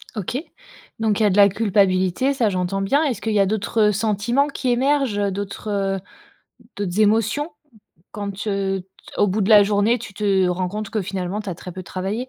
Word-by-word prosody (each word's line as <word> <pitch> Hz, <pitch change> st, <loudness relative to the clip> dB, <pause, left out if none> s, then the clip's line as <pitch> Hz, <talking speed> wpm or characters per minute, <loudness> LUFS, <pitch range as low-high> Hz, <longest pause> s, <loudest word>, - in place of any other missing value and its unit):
OK 215 Hz, +4 st, -3 dB, 0.6 s
donc 220 Hz, -2 st, +1 dB
il -, -, +2 dB
y -, -, +5 dB
a -, -, +3 dB
de 195 Hz, -, 0 dB
la 200 Hz, -1 st, +8 dB
culpabilité, 200 Hz, +3 st, +1 dB
ça, 240 Hz, -5 st, +1 dB
j'entends 185 Hz, +1 st, -2 dB
bien. 275 Hz, +11 st, +2 dB
Est-ce 260 Hz, -9 st, -2 dB
qu'il 220 Hz, -, -1 dB
y 210 Hz, -, +3 dB
a 195 Hz, -, +5 dB
d'autres 210 Hz, +1 st, +1 dB
sentiments 220 Hz, +6 st, +1 dB
qui 275 Hz, -2 st, -3 dB
émergent, 265 Hz, -3 st, +1 dB
heu, 200 Hz, -1 st, 0 dB
d'autres, 200 Hz, +2 st, -5 dB
heu, 195 Hz, -1 st, -1 dB, 0.8 s
d'autres 200 Hz, -1 st, -3 dB
émotions? 225 Hz, +9 st, +1 dB, 0.6 s
Quand 205 Hz, -1 st, -4 dB
t 200 Hz, +2 st, -6 dB
heu, 195 Hz, -1 st, -1 dB
t -, -, -34 dB, 0.3 s
au 205 Hz, -, +5 dB
bout 205 Hz, +2 st, -1 dB
de 195 Hz, -, 0 dB
la 210 Hz, -2 st, +8 dB
journée, 210 Hz, +4 st, +2 dB
tu 215 Hz, -3 st, -10 dB
te 195 Hz, -2 st, +2 dB
rends 180 Hz, +1 st, -1 dB
compte 210 Hz, +1 st, -5 dB
que 215 Hz, -3 st, -1 dB
finalement 190 Hz, +1 st, -3 dB
tu 210 Hz, -, -7 dB
as 175 Hz, -, -5 dB
très 180 Hz, -, -9 dB
peu 185 Hz, +1 st, -7 dB
travaillé? 195 Hz, +8 st, -4 dB
205 Hz, 215 wpm, -21 LUFS, 195-220 Hz, 0.8 s, la